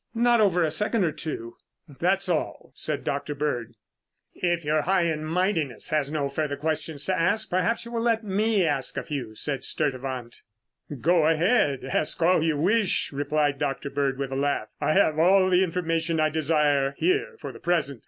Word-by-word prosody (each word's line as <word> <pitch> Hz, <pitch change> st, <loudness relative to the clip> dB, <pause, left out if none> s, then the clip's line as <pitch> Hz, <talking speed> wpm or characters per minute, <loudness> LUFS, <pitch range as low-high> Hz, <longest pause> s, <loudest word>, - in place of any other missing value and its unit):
"Not 235 Hz, 0 st, +3 dB
over 180 Hz, -4 st, +3 dB
a 155 Hz, -, 0 dB
second 210 Hz, +6 st, +1 dB
or 165 Hz, -, +1 dB
two." 145 Hz, -7 st, -6 dB, 0.3 s
"That's 180 Hz, +7 st, -1 dB
all," 170 Hz, -4 st, -2 dB
said -, -, -2 dB
Dr. 140 Hz, +1 st, -3 dB
Bird. 120 Hz, -6 st, -3 dB, 0.6 s
"If 175 Hz, -2 st, -1 dB
your 155 Hz, +1 st, +2 dB
high 185 Hz, +2 st, +2 dB
and 160 Hz, -2 st, -1 dB
mightiness 165 Hz, -, 0 dB
has 150 Hz, -2 st, +1 dB
no 150 Hz, -2 st, -1 dB
further 145 Hz, 0 st, -3 dB
questions 155 Hz, -1 st, -3 dB
to 190 Hz, -, 0 dB
ask, 185 Hz, +6 st, +1 dB
perhaps 185 Hz, +7 st, 0 dB
you 235 Hz, -, -9 dB
will 230 Hz, -1 st, -2 dB
let 230 Hz, -1 st, +1 dB
me 210 Hz, -1 st, +1 dB
ask 140 Hz, -4 st, -1 dB
a -, -, -2 dB
few," 130 Hz, -8 st, -5 dB
said 135 Hz, +3 st, -3 dB
Sturtevant. 130 Hz, -5 st, -2 dB, 0.6 s
"Go 165 Hz, -1 st, +3 dB
ahead, 165 Hz, -, +2 dB
ask 140 Hz, +3 st, -1 dB
all 170 Hz, 0 st, +3 dB
you 160 Hz, -2 st, +1 dB
wish," 195 Hz, +5 st, +1 dB
replied 145 Hz, 0 st, 0 dB
Dr. 140 Hz, 0 st, -3 dB
Bird 140 Hz, -1 st, -1 dB
with 135 Hz, -1 st, -4 dB
a -, -, -3 dB
laugh. 140 Hz, -6 st, -1 dB
"I -, -, +2 dB
have 155 Hz, -5 st, +3 dB
all 185 Hz, +3 st, +5 dB
the 180 Hz, +1 st, +4 dB
information 165 Hz, -2 st, -1 dB
I 155 Hz, 0 st, +3 dB
desire 150 Hz, -3 st, +1 dB
here 420 Hz, +6 st, 0 dB
for -, -, -6 dB
the -, -, -13 dB
present. 155 Hz, -7 st, -1 dB
155 Hz, 185 wpm, -25 LUFS, 140-185 Hz, 0.6 s, all